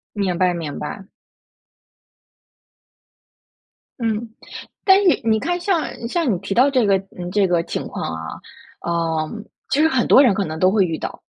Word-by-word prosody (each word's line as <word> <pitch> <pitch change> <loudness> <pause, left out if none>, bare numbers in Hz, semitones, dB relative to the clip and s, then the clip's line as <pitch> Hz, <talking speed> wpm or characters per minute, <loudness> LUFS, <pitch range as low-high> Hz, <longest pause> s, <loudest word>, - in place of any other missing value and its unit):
明 190 -4 -1
白， 180 0 +2
明 160 -4 -5
白。 195 -1 -7 2.9
嗯。 225 -1 -2 0.6
但是 385 -2 +5
你 220 -1 +2
看 350 +8 -1
像， 350 -4 +1 0.2
像 320 0 0
你 - - -1
提 195 - -4
到 255 +6 +5
这 255 -5 +2
个 195 -1 +4 0.2
嗯， 175 -1 -5
这 200 0 +2
个 175 -2 +2
情 - - -4
况 - - -6
啊， 80 0 -6 0.5
呃， 165 -2 -1 0.4
其 275 - +1
实 320 - +5
很 260 -6 +1
多 275 - +7
人 240 -7 +4
可 200 +1 -1
能 155 -1 -5
都 185 +2 +4
会 205 -1 +3
遇 165 -2 -3
到， - - -6
200 Hz, 180 characters per minute, -20 LUFS, 175-260 Hz, 2.9 s, 多